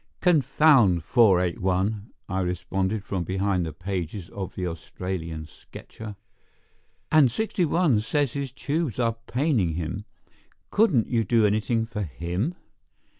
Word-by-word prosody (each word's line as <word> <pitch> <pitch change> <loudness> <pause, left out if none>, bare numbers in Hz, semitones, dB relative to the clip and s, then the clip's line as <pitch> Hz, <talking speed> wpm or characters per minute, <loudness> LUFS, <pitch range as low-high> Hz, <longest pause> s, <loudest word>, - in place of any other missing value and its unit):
"Confound 135 - +4
481" 95 0 +2 0.2
I 95 -2 -2
responded 95 +3 -1
from 95 -3 -2
behind 95 +1 0
the - - -4
pages 90 +1 -5
of 95 -2 -6
the 90 - -3
Australian 85 -1 -5
Sketcher. 105 +6 -11 1.0
"And 155 -5 +6
61 170 - +1
says 140 +4 0
his 140 -2 -3
tubes 145 -1 -2
are 115 -2 +1
paining 125 - +1
him. 85 +5 -4 0.7
Couldn't 185 - +3
you 115 -2 +1
do 110 +2 +3
anything 110 +2 +1
for 115 -2 -5
him?" 90 - -3
105 Hz, 120 wpm, -25 LUFS, 90-125 Hz, 1.0 s, And